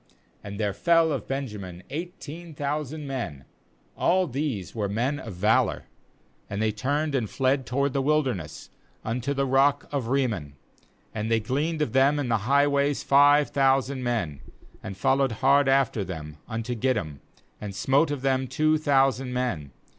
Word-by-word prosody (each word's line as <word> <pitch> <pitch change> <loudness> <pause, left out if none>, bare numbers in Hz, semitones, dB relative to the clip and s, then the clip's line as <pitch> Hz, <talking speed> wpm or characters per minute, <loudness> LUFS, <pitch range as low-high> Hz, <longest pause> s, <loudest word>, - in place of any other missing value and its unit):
'"And 100 0 -7
there 105 -2 0
fell 165 - +3
of 140 - -3
Benjamin 105 -10 -5
eighteen 165 0 -7
thou 145 +2 -1
sand 150 +1 -7
men; 85 - -5 0.5
all 185 +1 +2
these 130 - -3
were 105 -3 -2
men 125 +8 -1
of - - -7
valour. 105 +5 +2 0.7
4BAnd 100 - -4
they 110 0 +1
turned 145 +8 -1
and 120 -6 0
fled 130 -1 0
toward 140 +2 0
the 135 - +1
wilderness 130 - -1 0.3
unto 125 +5 -2
the 140 0 +1
rock 135 +2 +2
of 140 -4 -2
Rimmpn; 115 - -1 0.6
and 110 +1 -3
they 115 0 +3
gleaned 150 +8 -1
of 120 - -4
them 135 +2 +4
in 140 -4 -2
the 115 - +3
highways 140 0 +2
five 145 +1 +5
thousand 135 -1 +2
men; 105 - -2 0.4
and 95 0 -7
followed 135 +4 +2
hard 135 +4 +3
after 135 -6 +2
them 80 -5 -7
unto 115 +1 -3
Gidom, 105 - -1 0.4
and 100 -2 -6
smote 135 +10 +2
of 145 -3 -4
them 130 -1 +1
two 155 +3 +2
thousand 135 -3 +2
men. 120 - -2
135 Hz, 160 wpm, -26 LUFS, 110-145 Hz, 0.7 s, five